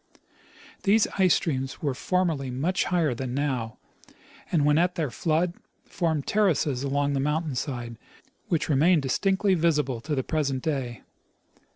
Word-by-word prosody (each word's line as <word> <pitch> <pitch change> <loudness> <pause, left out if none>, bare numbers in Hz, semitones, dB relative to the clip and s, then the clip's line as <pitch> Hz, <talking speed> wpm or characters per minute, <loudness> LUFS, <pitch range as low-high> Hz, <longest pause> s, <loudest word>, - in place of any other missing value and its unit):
These 210 +2 +4
ice 185 -3 +5
streams 135 -3 -3
were 140 -3 0
formerly 165 -3 -1
much 145 +9 0
higher 165 -6 +1
than 125 +1 -4
now, 130 -6 -2 0.7
and 155 -5 +2
when 150 +1 +4
at 180 +1 +1
their 155 -7 -2
flood 165 +7 0 0.3
formed 160 -5 -1
terraces 155 -10 +1
along 140 +1 0
the 140 - 0
mountain 150 +2 -1
side, 120 -3 -4 0.5
which 165 -3 0
remain 160 +4 +4
distinctly 190 +8 +1
visible 150 -8 +1
to 150 +3 -2
the 130 - -1
present 140 -4 -1
day. 135 -6 -3
150 Hz, 145 wpm, -26 LUFS, 135-170 Hz, 0.7 s, ice